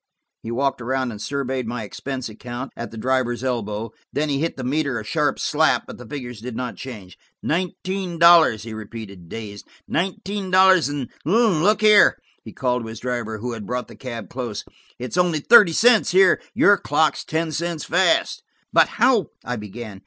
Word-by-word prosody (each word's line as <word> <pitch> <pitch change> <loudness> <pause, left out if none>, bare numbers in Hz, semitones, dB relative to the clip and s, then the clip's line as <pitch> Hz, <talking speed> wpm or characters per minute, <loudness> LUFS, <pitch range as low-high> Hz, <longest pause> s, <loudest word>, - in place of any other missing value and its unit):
He 115 - -7
walked 135 +2 -1
around 130 +1 -1
and 105 -2 -9
surveyed 135 -2 -3
my 120 -1 -4
expense 130 +5 -5
account, 120 +4 -7
at 120 - -6
the 115 - -11
driver's 125 +1 -1
elbow. 115 -3 -3 0.2
Then 150 +2 -1
he 140 -1 0
hit 165 0 -2
the 130 - -5
meter 140 -1 -1
a 110 - -8
smart 150 +5 0
slap, 155 +1 +2
but - - -10
the - - -11
figures 125 -6 -7
did 125 0 -6
not 125 +1 -4
change. 105 -9 -10 0.2
"Nineteen 185 +1 -2
dollars!" 165 - +6
he 115 -1 -7
repeated 105 -5 -9
dazed. 105 -2 -8 0.2
"Nineteen 190 +2 -3
dollars 185 -3 +5
and–look 180 - +1
here," 210 -1 +6 0.3
he - - -10
called 125 -2 -1
to 115 - -7
his 110 0 -8
driver, 120 -3 -3
who 120 +3 -4
had 110 -4 -7
brought 125 0 -3
the - - -13
cab 115 -4 -7
close, 120 -5 -5 0.3
"it's 125 +7 -5
only 175 -3 +2
thirty 210 +2 +7
cents 225 +5 +4
here. 190 +1 +4
Your 205 -1 +5
clock's 150 +2 +1
ten 160 0 -2
cents 170 0 -3
fast." 320 - +2 0.3
"But - - +6
how–" 240 -6 +2 0.2
I 125 - -2
began. 105 -1 -8
130 Hz, 180 wpm, -22 LUFS, 115-170 Hz, 0.3 s, thirty